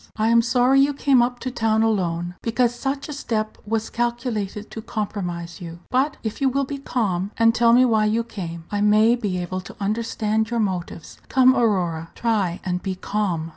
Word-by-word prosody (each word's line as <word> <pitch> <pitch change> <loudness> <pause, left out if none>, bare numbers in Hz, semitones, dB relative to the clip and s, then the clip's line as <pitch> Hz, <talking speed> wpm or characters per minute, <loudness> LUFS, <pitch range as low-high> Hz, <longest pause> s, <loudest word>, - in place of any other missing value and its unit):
I 220 +1 +1
am 230 0 +5
sorry 250 +3 +3
you 280 +1 +2
came 275 -3 +4
up 245 +1 0
to 255 - -3
town 225 -2 +1
alone, 175 -5 0
because 240 +1 +1
such 275 +3 -3
a 300 - -5
step 215 -6 -3
was 225 0 -2
calculated 235 -4 -3
to 220 - -6
compromise 185 -6 -4
you; 170 -1 -7
but 270 +3 +1
if 220 +4 -4
you 270 - +4
will 275 +2 0
be 280 +1 -5
calm, 200 -8 -1
and 230 0 +5
tell 230 0 +4
me 250 +2 +6
why 220 -3 +3
you 220 +2 +1
came, 170 -7 -7
I 205 0 -1
may 215 +3 +5
be 205 -6 -2
able 180 +1 -3
to 185 - -11
understand 220 +1 -1
your 235 0 -1
motives. 180 -5 -4
Come, 260 0 +5
Aurora, 180 -9 0
try 205 -7 0
and 180 -1 -1
be 190 -2 -3
calm." 185 -5 -2
220 Hz, 195 wpm, -22 LUFS, 190-240 Hz, -, me